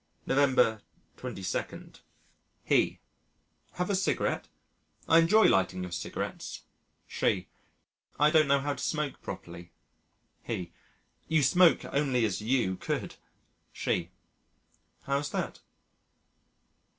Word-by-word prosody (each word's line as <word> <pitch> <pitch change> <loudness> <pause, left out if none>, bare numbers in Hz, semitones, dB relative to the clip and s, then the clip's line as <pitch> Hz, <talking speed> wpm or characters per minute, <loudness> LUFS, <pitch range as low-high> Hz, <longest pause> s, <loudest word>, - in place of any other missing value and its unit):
November 130 -5 +3 0.4
22. 95 -1 -5 0.6
He: - - +2 0.7
"Have 180 +3 -2
a - - +2
cigarette? 190 - 0 0.6
I 165 - +6
enjoy 210 +7 +5
lighting 95 -1 +2
your 90 - -6
cigarettes." 85 - -5 0.4
She: - - -1 0.7
"I 150 +1 +5
don't 155 -2 +5
know 140 0 +3
how 145 +1 -1
to - - -7
smoke 150 -3 -2
properly." 85 0 -8 0.7
He: 90 -2 -5 0.6
"You 160 -2 +2
smoke 175 +5 +5
only 135 -5 +1
as 100 -2 -2
you 110 -5 +1
could." - - -4 0.6
She: - - -1 0.9
"How's 140 +1 -1
that?" - - -3
140 Hz, 100 wpm, -29 LUFS, 105-155 Hz, 0.9 s, I